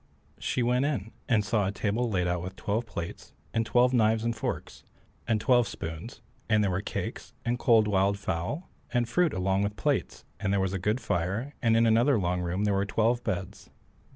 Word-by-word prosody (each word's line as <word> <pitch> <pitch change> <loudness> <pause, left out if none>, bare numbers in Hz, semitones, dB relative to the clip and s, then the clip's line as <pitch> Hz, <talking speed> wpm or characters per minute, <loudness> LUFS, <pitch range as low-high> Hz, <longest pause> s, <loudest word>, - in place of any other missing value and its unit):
She 125 - 0
went 125 +2 +2
in, 115 -8 -1 0.2
and 110 -4 +3
saw 105 -2 +1
a - - 0
table 110 +4 -1
laid 90 -4 +1
out 90 0 0
with 95 +2 -6
twelve 110 +3 -2
plates, 85 -5 -7 0.2
and 115 0 0
twelve 125 +2 +4
knives 110 -2 +3
and 115 0 0
forks, 115 - -4 0.4
and 110 - +2
twelve 120 +1 +4
spoons, 80 +9 -7 0.3
and 110 -1 +4
there 100 - +1
were 90 +2 -1
cakes, - - -5
and 120 +1 0
cold 115 -4 +5
wild 100 0 +2
fowl, 95 - -3 0.2
and 120 -2 +1
fruit 170 +7 +2
along 95 +1 0
with 100 +1 -1
the 100 - -13
plates, - - 0
and 100 -1 -1
there 100 - +2
was 95 0 0
a 95 - -1
good 105 +6 0
fire, 105 +8 -1
and 115 -2 +4
in 115 - +4
another 115 +4 +4
long 90 -2 0
room 90 +3 -1
there 105 -1 +2
were 100 0 +2
twelve 115 +3 +1
beds. 90 0 -4
105 Hz, 210 wpm, -28 LUFS, 95-120 Hz, 0.4 s, cold